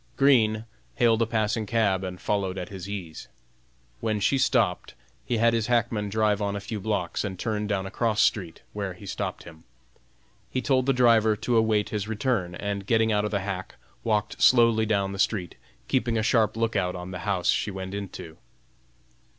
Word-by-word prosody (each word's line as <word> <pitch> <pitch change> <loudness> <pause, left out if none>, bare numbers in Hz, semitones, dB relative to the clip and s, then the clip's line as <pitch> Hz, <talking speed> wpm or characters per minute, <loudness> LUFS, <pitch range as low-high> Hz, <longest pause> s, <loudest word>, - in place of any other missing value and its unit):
Green 115 -6 +4 0.3
hailed 115 -1 +3
a 115 - +2
passing 110 -1 -1
cab 100 -5 +1
and 90 -1 -5
followed 95 -2 -1
at 90 - -5
his 95 -1 -8
ease. 90 -6 -6 0.7
When 110 -1 -1
she 135 +7 +2
stopped, 110 -10 +1 0.3
he 120 - 0
had 115 +1 +3
his 115 -2 0
hackman 115 -3 0
drive 105 0 +1
on 100 0 -1
a - - -2
few 105 +2 -5
blocks 95 -4 -2
and 95 -3 -4
turn 105 +1 -2
down 100 -2 -1
a 95 - -6
cross 110 -1 0
street, 90 -6 -1
where 100 -3 -3
he 100 - -12
stopped - - -4
him. 80 -1 -13 0.9
He 130 - -2
told 130 0 +1
the - - +5
driver 115 -4 +4
to 120 +3 -1
await 110 -2 +2
his 105 -1 -3
return, 105 -5 -1
and 100 0 -4
getting 110 -1 +3
out 105 0 +1
of - - -1
the 100 -2 -1
hack, 95 -1 -5 0.3
walked 105 -2 -1
slowly 115 -3 +5
down 100 -2 +1
the 100 - -7
street, 95 -4 0 0.3
keeping 120 -3 +1
a 110 - 0
sharp 110 -2 +2
lookout 105 -6 0
on 90 +1 -7
the 90 - -5
house 95 -1 -1
she - - +1
went 95 -1 -6
into. 95 -5 -7
105 Hz, 190 wpm, -26 LUFS, 95-115 Hz, 0.9 s, the